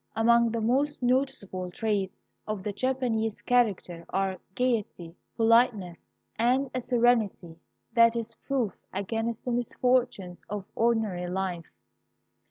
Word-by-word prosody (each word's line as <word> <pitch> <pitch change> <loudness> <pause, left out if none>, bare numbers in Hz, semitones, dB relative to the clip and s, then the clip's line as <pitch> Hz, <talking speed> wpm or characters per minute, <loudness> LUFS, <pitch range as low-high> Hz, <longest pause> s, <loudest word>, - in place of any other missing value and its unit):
Among 235 +1 +4
the 230 0 -2
most 265 +5 +1
noticeable 240 -8 0
traits 200 -1 -2 0.2
of 215 -3 -3
the 210 - -3
Japanese 235 -3 -1
character 205 -8 +1
are 190 -1 -1 0.2
gayety, 215 -9 -1 0.2
politeness, 225 -6 +3 0.4
and 255 +4 +2
a 255 - -1
serenity 230 -9 +1 0.3
that 230 -1 +5
is 230 0 -3
proof 245 -6 -2 0.2
against 225 +4 -3
the 250 - -1
misfortunes 240 -6 0
of 205 -1 -4
ordinary 220 -6 0
life. 180 -2 -3
225 Hz, 115 wpm, -28 LUFS, 190-245 Hz, 0.4 s, that